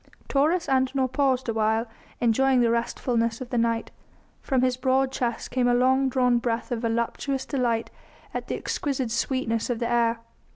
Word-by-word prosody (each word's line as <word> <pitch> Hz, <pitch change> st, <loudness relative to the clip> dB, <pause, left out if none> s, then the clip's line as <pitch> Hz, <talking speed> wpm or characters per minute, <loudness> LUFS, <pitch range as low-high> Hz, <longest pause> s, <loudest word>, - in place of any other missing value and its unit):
Taurus 315 Hz, +5 st, +2 dB
Antinor 260 Hz, 0 st, +1 dB
paused 260 Hz, -2 st, +1 dB
awhile, 220 Hz, 0 st, +1 dB, 0.3 s
enjoying 255 Hz, +2 st, +3 dB
the 235 Hz, -1 st, +3 dB
restfulness 235 Hz, 0 st, -1 dB
of 255 Hz, -2 st, -8 dB
the 245 Hz, -, 0 dB
night; 230 Hz, 0 st, 0 dB, 0.5 s
from 260 Hz, -3 st, +1 dB
his 255 Hz, -1 st, +2 dB
broad 260 Hz, +1 st, +1 dB
chest 240 Hz, -3 st, -3 dB
came 245 Hz, 0 st, +1 dB
a 245 Hz, -, +3 dB
long 260 Hz, +2 st, +3 dB
drawn 250 Hz, -2 st, +2 dB
breath 235 Hz, 0 st, -2 dB
of 240 Hz, -, -1 dB
voluptuous 235 Hz, +4 st, -1 dB
delight 240 Hz, -5 st, -1 dB, 0.4 s
at -, -, -4 dB
the -, -, -2 dB
exquisite 265 Hz, -5 st, -2 dB
sweetness 235 Hz, -2 st, -1 dB
of 240 Hz, -, 0 dB
the 235 Hz, 0 st, -1 dB
air. 235 Hz, -1 st, +2 dB
245 Hz, 165 wpm, -25 LUFS, 230-265 Hz, 0.5 s, enjoying